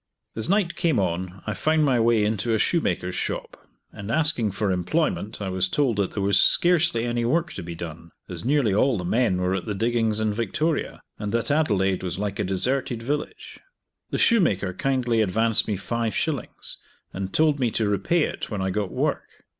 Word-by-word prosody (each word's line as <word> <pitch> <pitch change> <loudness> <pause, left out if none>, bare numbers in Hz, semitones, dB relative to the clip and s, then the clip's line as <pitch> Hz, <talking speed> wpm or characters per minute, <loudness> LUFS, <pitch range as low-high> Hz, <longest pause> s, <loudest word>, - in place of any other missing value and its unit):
As 110 +8 -3
night 195 -3 +2
came 165 - +1
on 90 0 -2
I 105 - -2
found 155 +7 +2
my 130 -4 +3
way 115 -1 +3
into 110 +2 0
a - - +2
shoemaker's 95 - 0
shop, - - -3 0.4
and 100 -1 -8
asking 150 -6 +2
for 100 0 -1
employment 105 - -1
I 100 -2 -3
was 95 0 0
told 130 -4 +1
that 100 -2 0
there 100 - -1
was 100 0 +3
scarcely 165 - +3
any 120 0 -1
work 165 +8 0
to - - -6
be 85 0 -7
done, 85 0 -8 0.2
as 90 -3 -5
nearly 135 -5 +2
all 120 +4 +3
the 90 - -4
men 110 -1 +2
were 90 +1 0
at 95 -2 -3
the 105 - -2
diggings 115 0 +1
in 110 -1 0
Victoria, 140 - -2 0.2
and 105 -1 -3
that 115 +4 0
Adelaide 100 - +1
was 90 -1 -3
like 100 0 -3
a - - +1
deserted 115 +5 -1
village. 145 +4 -4 0.5
The - - -2
shoemaker 100 - +3
kindly 125 0 +1
advanced 110 +2 +1
me 105 -3 -1
five 115 +3 -2
shillings, 145 -8 -3 0.3
and 95 0 -4
told 155 -2 +3
me 125 -3 +2
to 110 -1 0
repay 105 - +1
it - - -4
when 105 - -3
I 95 0 -1
got 100 0 -1
work. - - -3
110 Hz, 195 wpm, -24 LUFS, 95-135 Hz, 0.5 s, my